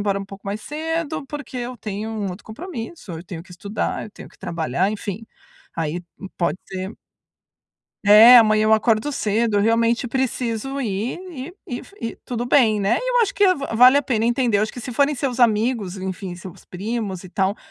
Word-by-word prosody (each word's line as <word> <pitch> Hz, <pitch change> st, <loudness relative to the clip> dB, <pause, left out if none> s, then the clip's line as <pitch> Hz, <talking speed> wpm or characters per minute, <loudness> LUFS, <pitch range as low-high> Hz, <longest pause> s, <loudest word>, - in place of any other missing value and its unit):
embora 200 Hz, -1 st, 0 dB
um -, -, -5 dB
pouco 195 Hz, 0 st, -12 dB
mais 205 Hz, +2 st, -3 dB
cedo, 315 Hz, 0 st, -3 dB
porque 295 Hz, -2 st, -7 dB
eu 245 Hz, +1 st, -4 dB
tenho 210 Hz, +1 st, -5 dB
um 210 Hz, -3 st, -3 dB
outro 180 Hz, -, -9 dB
compromisso, 235 Hz, -, -7 dB
eu 165 Hz, +1 st, -6 dB
tenho 165 Hz, -2 st, -7 dB
que -, -, -21 dB
estudar, 200 Hz, +4 st, -3 dB
eu 215 Hz, -, -10 dB
tenho -, -, -12 dB
que -, -, -22 dB
trabalhar", 165 Hz, +3 st, -1 dB
enfim, 210 Hz, 0 st, -5 dB, 0.5 s
aí 165 Hz, +2 st, -2 dB, 0.3 s
pode 175 Hz, +1 st, 0 dB
ser 190 Hz, +2 st, -6 dB, 1.1 s
é, 220 Hz, +4 st, +10 dB
"Amanhã 215 Hz, -2 st, +5 dB
eu 220 Hz, -, +4 dB
acordo 220 Hz, +4 st, +2 dB
cedo, 220 Hz, -3 st, 0 dB
eu -, -, +4 dB
realmente 230 Hz, +3 st, +2 dB
preciso 260 Hz, +1 st, -2 dB
ir" 215 Hz, -, -2 dB
e 295 Hz, +2 st, -7 dB, 0.2 s
e 245 Hz, -, -4 dB
f 400 Hz, -, -16 dB
e 230 Hz, -, -4 dB
tudo 240 Hz, 0 st, -3 dB
bem, 225 Hz, -5 st, +4 dB
né. 200 Hz, +4 st, +2 dB
E -, -, -2 dB
eu -, -, +4 dB
acho 415 Hz, -, -1 dB
que 395 Hz, -2 st, +5 dB
va-vale 255 Hz, -1 st, +5 dB
a 285 Hz, -, +3 dB
pena 230 Hz, -4 st, 0 dB
entender. 240 Hz, -3 st, +2 dB
Acho 215 Hz, +1 st, 0 dB
que 245 Hz, -, -8 dB
se 250 Hz, +2 st, -6 dB
forem 285 Hz, +4 st, +2 dB
seus 255 Hz, -2 st, -2 dB
amigos, 220 Hz, -3 st, +2 dB
enfim, 190 Hz, -1 st, -5 dB
seus 180 Hz, +1 st, -11 dB
primos 200 Hz, -1 st, -4 dB
e -, -, -9 dB
tal, 195 Hz, +2 st, 0 dB
220 Hz, 195 wpm, -22 LUFS, 200-255 Hz, 1.1 s, é